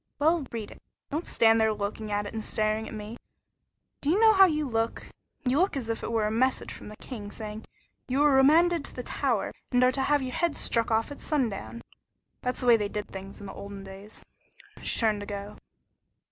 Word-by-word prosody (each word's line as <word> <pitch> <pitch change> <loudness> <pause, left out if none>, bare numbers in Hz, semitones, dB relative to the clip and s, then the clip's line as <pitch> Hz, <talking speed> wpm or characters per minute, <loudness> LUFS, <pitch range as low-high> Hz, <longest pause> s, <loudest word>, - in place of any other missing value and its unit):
"Well, 310 -1 +2
read 225 -3 -5
it. - - -14 0.3
Don't 310 +4 -2
stand 225 0 +4
there 220 0 +4
looking 210 +1 -4
at 205 0 0
it - - -7
and 220 -1 -4
staring 215 +1 0
at - - -8
me. 215 +2 -7 0.8
Do 285 - -1
you 365 +6 +4
know 440 -1 +7
how 385 -1 +8
you 305 -3 0
look? 225 -1 -1 0.4
You 255 +4 +2
look 370 -5 +2
as 235 -4 -4
if 225 - -4
it - - -4
were 225 -2 +1
a 210 - 0
message 255 +4 +1
from - - -10
the 210 - -9
king, 210 -3 -8
saying: 215 +1 -7 0.4
'You 270 +3 +2
are 295 - +5
remanded 315 +5 +5
to - - -8
the 250 - -5
tower, 245 -4 -1 0.2
and 245 0 +4
are 255 - +5
to 270 - -1
have 290 +1 +2
your 255 -1 -4
head 340 -3 0
struck 230 -1 0
off 225 +4 +1
at 285 - -8
sundown.' 235 -5 -2 0.6
That's 250 +1 -2
the - - -2
way 240 -2 +7
they 205 -2 -2
did 210 0 -4
things 195 0 -8
in 205 - -9
the 195 - -7
olden 200 0 -8
days." 195 +2 -10 0.6
She - - 0
turned 215 -3 +2
to 205 - -7
go. 200 0 -6
230 Hz, 225 wpm, -28 LUFS, 210-280 Hz, 0.8 s, how